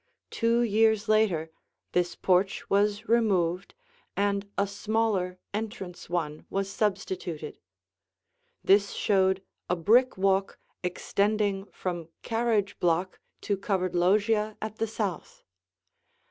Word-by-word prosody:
Two 230 0 +2
years 220 0 +3
later 200 -7 +2 0.4
this 175 -1 0
porch 190 +1 +1
was 205 +2 +2
removed, 195 -6 +1 0.4
and 200 0 0
a 200 - +3
smaller 200 -2 -1 0.2
entrance 205 -5 -5
one 155 -4 -2
was 195 0 -2
substituted. 180 -7 -3 1.0
This 200 +1 +4
showed 190 -1 +2 0.3
a 180 - +2
brick 230 +9 +3
walk 195 0 +1 0.2
extending 200 +2 0
from 175 -5 -5
carriage 225 -3 0
block 175 +2 0 0.2
to 205 - 0
covered 190 -2 -1
loggia 210 +4 +2
at 215 0 -5
the 225 - 0
south. 210 -4 -4
200 Hz, 105 wpm, -28 LUFS, 180-215 Hz, 1.0 s, This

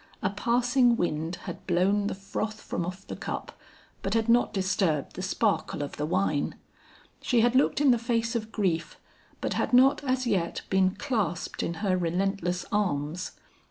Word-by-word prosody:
A 190 - +1
passing 240 +3 +3
wind 165 -1 -1
had - - -8
blown 195 +3 +2
the - - -2
froth 210 +2 -4
from 170 - -3
off 185 +2 -7
the - - -6
cup, - - -5 0.5
but 195 +3 -1
had 225 0 +2
not 235 +1 +4
disturbed 190 -7 0
the - - -5
sparkle 190 -5 0
of 145 - -7
the 150 - -1
wine. 160 -4 0 0.7
She 240 -3 +2
had 240 +1 +3
looked 265 +2 +3
in 290 -3 +5
the 240 - +3
face 230 0 0
of 220 -1 -3
grief, 175 -7 -1 0.4
but - - -1
had - - -1
not 265 +3 +5
as 255 -1 0
yet 190 -7 0
been 190 0 +3
clasped 210 - -2
in 170 - -2
her 185 -2 +3
relentless 180 +1 -1
arms. 175 -4 -1
195 Hz, 170 wpm, -28 LUFS, 175-230 Hz, 0.7 s, in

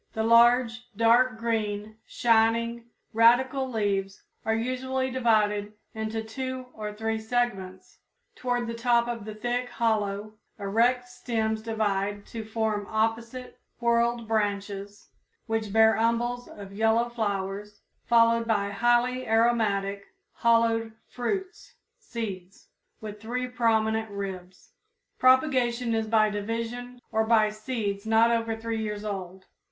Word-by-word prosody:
The 220 - -1
large, 235 +1 +4
dark 230 +1 +4
green, 215 -2 -2
shining 230 0 +2 0.3
radical 260 +4 +4
leaves 200 -4 -2 0.2
are 220 - +2
usually 260 +2 -2
divided 215 -4 +1 0.2
into 220 0 -3
two 260 +3 -5
or 210 -1 -5
three 220 +1 -2
segments. 220 -5 -3 0.4
Toward 245 -1 -1
the 230 - -4
top 235 0 +2 0.2
the 215 -1 -7
thick, 245 +3 -2
hollow, 215 -3 -1 0.2
erect 235 +5 +1
stems 225 -3 -2
divide 205 -2 -2
to 225 -1 -4
form 220 -2 -2
opposite, 230 +3 -2 0.2
whorled 235 -1 +1
branches 205 -2 -3 0.4
which 225 -2 -2
bear 220 +1 +5
umbels 240 +2 0
of 200 -1 -11
yellow 225 +3 +2
flowers, 205 -2 -4 0.2
followed 230 0 +3
by 205 -3 0
highly 240 +3 +1
aromatic, 215 -3 +1 0.3
hollowed 230 -1 +2 0.2
fruits 375 +10 -4 0.2
("seeds") 195 -5 -7 0.3
with 210 -1 -8
three 250 +3 -3
prominent 220 -2 +1
ribs. 190 -2 -7 0.5
Propagation 255 -3 +3
is 225 -1 0
by 215 -1 +3
division 230 +4 -4
or 220 0 +2
by 220 -1 +3
seeds 215 -2 -4
not 225 +1 +4
over 230 -1 0
three 225 0 -3
years 210 -1 -4
old. 190 -2 -6
225 Hz, 115 wpm, -27 LUFS, 210-240 Hz, 0.5 s, bear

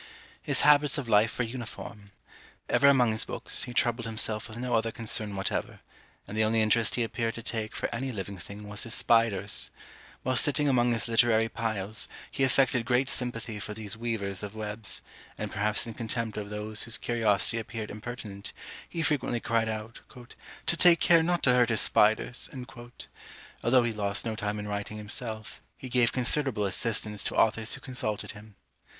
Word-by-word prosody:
His - - +2
habits 145 -1 +5
of 140 -4 -4
life 110 +1 +3
were 125 - 0
uniform. 110 -3 -8 0.6
Ever 140 - +4
among 125 -4 +5
his 110 - -2
books, - - +3
he 125 - -8
troubled 120 -1 +1
himself 110 -1 -1
with 110 - -9
no 125 0 -3
other 115 0 +2
concern 110 -2 -1
whatever; 95 0 -2 0.5
and 105 - -7
the 110 - +2
only 110 +1 +2
interest 110 0 +2
he 120 - +1
appeared 115 0 -2
to 115 - -7
take 110 -3 -4
for - - -3
any 130 +3 -3
living 100 -3 -6
thing 105 +3 -9
was 105 0 -3
his 115 0 -1
spiders. 110 -4 +3 0.5
While 130 -1 +1
sitting 145 +2 +3
among 120 -3 +3
his 115 - 0
literary 115 -1 +3
piles, 110 -3 -2 0.2
he 135 - -1
affected 130 -2 +2
great 125 +3 +1
sympathy 115 -4 -2
for 105 +1 -6
these 105 -2 -6
weavers 110 -4 -3
of 105 0 -7
webs, 105 0 -5 0.3
and - - -5
perhaps 105 +1 0
in 115 - -7
contempt 115 -1 -3
of 105 -1 -5
those 105 +1 -1
whose 115 - +2
curiosity 115 -1 0
appeared 110 -1 -6
impertinent, 105 -2 -7 0.4
he 165 - -3
frequently 145 -5 0
cried 115 -1 0
out, 110 +1 -6 0.6
"to - - +2
take 170 -1 +6
care 170 -2 +5
not 175 +1 0
to 125 - +5
hurt 125 -1 +4
his 115 - +4
spiders!" 110 +3 +3 1.1
Although 125 +1 +4
he 120 -1 -1
lost 100 0 -2
no 110 -1 -2
time 105 0 -3
in 105 0 -5
writing 105 +1 -4
himself, 110 0 -6 0.2
he 130 - -8
gave 120 -1 +3
considerable 125 -3 +1
assistance 105 0 -1
to - - -2
authors 110 0 +2
who - - -11
consulted 110 -6 -3
him. 105 -1 -14
115 Hz, 180 wpm, -28 LUFS, 105-120 Hz, 1.1 s, take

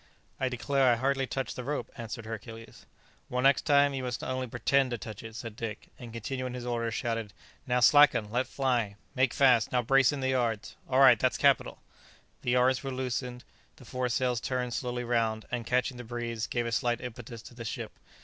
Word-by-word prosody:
"I 130 - +1
declare 130 +1 +2
I - - +4
hardly 135 +2 0
touched 135 +3 -3
the 125 - -5
rope," 145 +3 -3
answered 115 -1 -6
Hercules. 115 +1 -9 0.4
"Well, 125 0 -1
next 135 +3 +4
time, 140 -1 +5
you 135 - -3
must 125 -2 -4
only 130 0 -2
pretend 130 +3 +1
to 120 - -3
touch 110 0 -8
it," 115 -1 -9
said 115 -2 -7
Dick; 110 -2 -6
and, 120 -2 -9
continuing 125 +3 -4
his 125 -1 -6
orders, 115 -2 -2
shouted, 115 -4 -3 0.3
"Now 125 0 +2
slacken! 120 -5 +6
let 125 +2 0
fly! 125 -7 0 0.2
make 130 -2 +2
fast! 125 -5 +4
now 125 -1 +1
brace 135 +3 +4
in 145 - -4
the 130 0 0
yards! 120 -5 -1
all 130 +1 +3
right! 125 -5 +8
that's - - +1
capital!" - - +2 0.6
The - - -3
yards 125 +2 +3
were 135 - -3
loosened, 125 -1 -3 0.3
the 130 - -15
foresails 125 -1 -1
turned 125 -2 -2
slowly 125 0 -3
round, 115 -2 0
and, 120 -2 -3
catching 125 0 0
the 125 - -7
breeze, 120 -1 -4
gave 120 -1 -1
a 115 - -2
slight 120 +1 0
impetus 120 -2 -8
to - - -12
the 120 -1 -8
ship. 110 - -5
125 Hz, 200 wpm, -29 LUFS, 115-130 Hz, 0.6 s, right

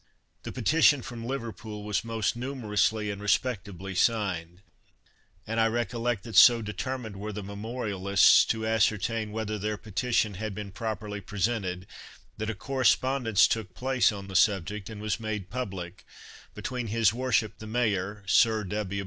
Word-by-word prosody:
The - - -6
petition 145 +1 +3
from 115 -1 -7
Liverpool 115 -4 -5
was 105 -1 -1
most 115 -2 -1
numerously 110 -4 0
and 100 0 -7
respectably 100 -3 -1
signed; 95 -4 0 0.8
and 115 +1 -2
I 115 - +4
recollect 115 -1 -1
that 115 -3 -8
so 120 +4 +8
determined 110 +1 -5
were 105 +2 -5
the 105 0 -6
memorialists 100 -1 +3
to 110 -1 -1
ascertain 110 0 +1
whether 110 -1 -3
their 105 +1 -2
petition 110 0 0
had 105 +1 -5
been 105 -1 -6
properly 105 0 -4
presented 95 -2 -2 0.5
that 110 +1 -3
a 110 - -3
correspondence 130 -1 +2
took 105 -6 -3
place 130 -2 +2
on 100 -2 -7
the 95 - -8
subject 100 +1 +1
and 110 -2 -8
was 105 +1 -1
made 105 -4 -4
public, 100 -5 -5 0.5
between 125 -2 -4
his 110 -1 +2
worship 120 -3 0
the 110 - -8
mayor, 105 -3 -1
Sir 110 +2 +4
W. 100 0 -3
110 Hz, 150 wpm, -28 LUFS, 100-115 Hz, 0.8 s, so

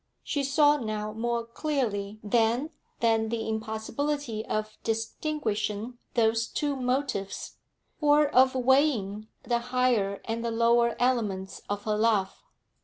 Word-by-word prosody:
She 285 - -1
saw 290 +2 +4
now 215 -4 -3
more 235 +1 -1
clearly 230 -6 -2
than 235 +7 +1 0.3
then 225 -1 +2
the 230 -1 -2
impossibility 220 +3 -2
of 215 0 -2
distinguishing 225 -1 -2 0.2
those 225 -1 +2
two 290 -1 -1
motives, 250 -6 -2 0.4
or 295 -1 +5
of 260 -1 +5
weighing 250 -6 +2 0.2
the 240 -1 +1
higher 240 -5 +1
and 230 +1 -3
the 235 - -1
lower 235 +1 +3
elements 215 -7 0
of 205 0 -2
her 215 -1 0
love. 210 -3 +1
230 Hz, 120 wpm, -28 LUFS, 215-260 Hz, 0.4 s, or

